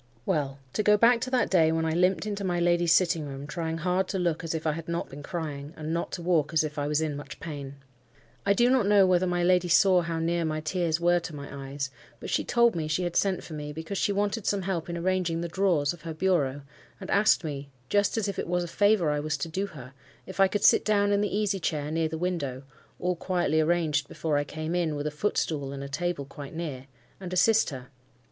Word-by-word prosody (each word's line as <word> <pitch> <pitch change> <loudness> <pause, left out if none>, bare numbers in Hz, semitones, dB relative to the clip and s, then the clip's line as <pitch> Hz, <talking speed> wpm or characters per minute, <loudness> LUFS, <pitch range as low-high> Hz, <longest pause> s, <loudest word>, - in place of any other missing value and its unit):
Well, 145 -7 -1 0.2
to - - +1
go 210 0 +5
back 235 +2 +5
to 255 - -2
that 255 -1 +1
day 165 -4 +4
when 160 0 0
I 160 - 0
limped 180 +4 +2
into 205 -1 -3
my 175 -2 0
lady's 175 -1 +2
sitting 165 -4 +3
room, 135 0 -7
trying 160 +2 -3
hard 180 +3 0
to 195 - -2
look 170 -3 -1
as 165 0 -3
if 160 - -4
I 155 - +3
had 165 +2 -6
not 170 0 -2
been 140 +2 -9
crying, 150 -1 -5
and 155 0 -4
not 170 - -2
to 175 - -4
walk 165 -3 +1
as 160 - +3
if 150 0 -4
I 145 - -1
was 150 +1 +1
in 155 -2 -1
much 140 -1 -8
pain. 140 -4 -7 0.7
I 200 - +3
do 240 +4 +3
not 255 -6 +3
know 200 -2 +6
whether 185 0 +3
my 175 0 0
lady 180 0 +3
saw 180 +1 +5
how 165 -1 -3
near 170 +1 0
my 155 -1 -1
tears 165 0 -1
were 175 +1 +3
to 165 -2 -7
my 140 -1 -8
eyes, 140 -1 -4 0.3
but - - -6
she - - +1
told 235 -3 +3
me 160 -2 -2
she 155 +4 0
had 175 -1 -3
sent 195 -2 +1
for 160 - -9
me, 150 -1 -5
because 160 +6 -5
she - - +1
wanted 205 +2 -1
some 200 -2 +1
help 175 -3 -2
in 170 - -3
arranging 175 -2 0
the 170 - -2
drawers 170 -5 +1
of 175 - -13
her 160 0 -6
bureau, 150 -6 +1 0.4
and 190 - -7
asked 210 -2 +4
me—just 140 - -2
as 215 -2 0
if 200 - -3
it - - -3
was 175 0 0
a - - -5
favour 205 -3 +3
I 150 - 0
was 150 +1 -2
to - - -3
do 195 +5 -2
her—if 140 +5 -13
I 195 - +7
could 205 +1 -2
sit - - +6
down 205 -1 +2
in 200 0 +2
the 205 -1 -1
easy 205 -2 0
chair 150 -3 -2
near 160 0 +1
the 160 - -4
window—(all 165 +1 -4
quietly 175 -3 +1
arranged 155 -3 +1
before 155 -2 -2
I 145 - 0
came 155 +3 -4
in, 170 -4 0
with 145 0 -4
a 150 - -1
footstool, 150 -4 -1
and 140 0 -6
a - - -5
table 165 +1 -2
quite 140 +2 -10
near)—and 145 +3 -8
assist 220 +4 +4
her. 130 -3 -8
170 Hz, 245 wpm, -27 LUFS, 150-185 Hz, 0.7 s, I